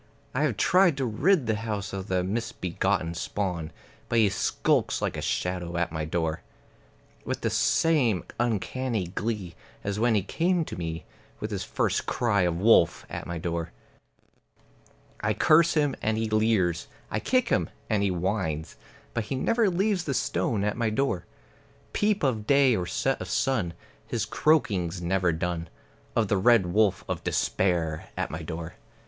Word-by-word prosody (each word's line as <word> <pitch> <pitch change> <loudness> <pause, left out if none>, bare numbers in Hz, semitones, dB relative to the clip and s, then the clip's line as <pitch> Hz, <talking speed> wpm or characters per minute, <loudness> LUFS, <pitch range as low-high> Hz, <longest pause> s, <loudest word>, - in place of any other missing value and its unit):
I 130 - 0
have 125 -9 -1
tried 180 - +4
to 135 - 0
rid 145 - +2
the 110 -1 0
house 105 -3 -4
of 95 0 -4
the 90 -2 +1
misbegotten 95 -4 -1
spawn; 85 -2 -3 0.4
But 120 - +1
he 110 -3 +5
skulks 95 - +1
like - - -2
a - - -4
shadow 90 -1 -2
at 90 -1 0
my 80 -1 -3
door, 80 0 -1 0.8
With - - -3
the - - 0
same 135 - +2 0.2
uncanny 120 -3 -1
glee 105 -2 -3 0.3
as 100 +1 -2
when 115 0 +3
he 100 - +2
came 170 - +1
to - - -6
me 80 -2 -5 0.3
With - - -4
his - - -2
first - - -1
cry 110 -5 +1
of 85 -1 +1
wolf 100 -5 +4
at - - -5
my 85 0 -4
door. 85 0 -3 1.5
I 105 0 0
curse 165 +8 +5
him, 145 -3 +2
and 110 0 0
he 110 0 0
leers; 105 -6 +2 0.2
I 105 - 0
kick 255 - +1
him, - - +1 0.2
and 105 -3 +1
he 100 - +2
whines; 90 -4 -2 0.4
But 115 - -1
he 135 - -3
never 225 - +2
leaves 190 0 0
the 140 - -1
stone 125 -6 0
at 105 +1 -1
my 115 -2 +1
door. 110 -6 -1 0.7
Peep 210 -3 +1
of 110 -6 0
day 140 -3 +5
or 90 -4 -2
set 135 +8 0
of - - -5
sun, 115 -11 0 0.3
his 110 -2 -1
croaking's 100 - +1
never 90 0 +1
done 85 +1 -3 0.5
Of 110 -2 +2
the 100 - +2
Red 115 0 +5
Wolf 105 -3 +2
of - - -3
Despair 85 -4 0
at - - -2
my 80 - -5
door. 80 +1 -6
105 Hz, 165 wpm, -27 LUFS, 90-125 Hz, 1.5 s, he